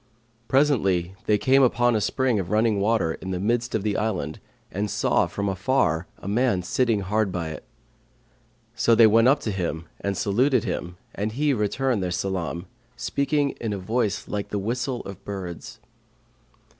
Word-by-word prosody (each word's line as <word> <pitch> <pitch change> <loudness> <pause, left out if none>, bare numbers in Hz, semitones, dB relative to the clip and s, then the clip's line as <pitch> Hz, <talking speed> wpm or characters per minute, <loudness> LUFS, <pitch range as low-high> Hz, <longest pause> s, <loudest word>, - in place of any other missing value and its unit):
Presently 105 -10 +2
they 105 - +4
came 135 +5 +4
upon 120 -2 +3
a 110 - +1
spring 130 -1 +1
of 90 -3 -4
running 110 0 +2
water 100 -5 +1
in 95 - -6
the 90 -1 -2
midst 120 +4 0
of 105 - -1
the 105 -1 0
island 90 -9 -2 0.3
and 105 +2 -2
saw - - +2
from 100 0 -3
afar 95 - +1
a - - -10
man 105 -3 +1
sitting 115 +3 +1
hard 105 +1 0
by 85 -3 -3
it. 80 - -8 1.1
So 115 - +3
they 115 - +7
went 115 +2 +5
up 140 +3 +4
to 110 - -2
him 85 -4 -3
and 100 -1 -2
saluted 125 +5 +2
him, 90 -3 -4 0.2
and 105 +2 -3
he 145 +3 +1
returned 120 +1 0
their 90 - -1
salam, 90 -1 -3 0.3
speaking 140 +2 0
in 110 -3 -2
a - - -3
voice 110 +2 -1
like 105 -1 -4
the 105 - -2
whistle[FN#538] 125 +4 -2
of 100 0 -9
birds. 95 -4 -7
105 Hz, 170 wpm, -24 LUFS, 95-120 Hz, 1.1 s, they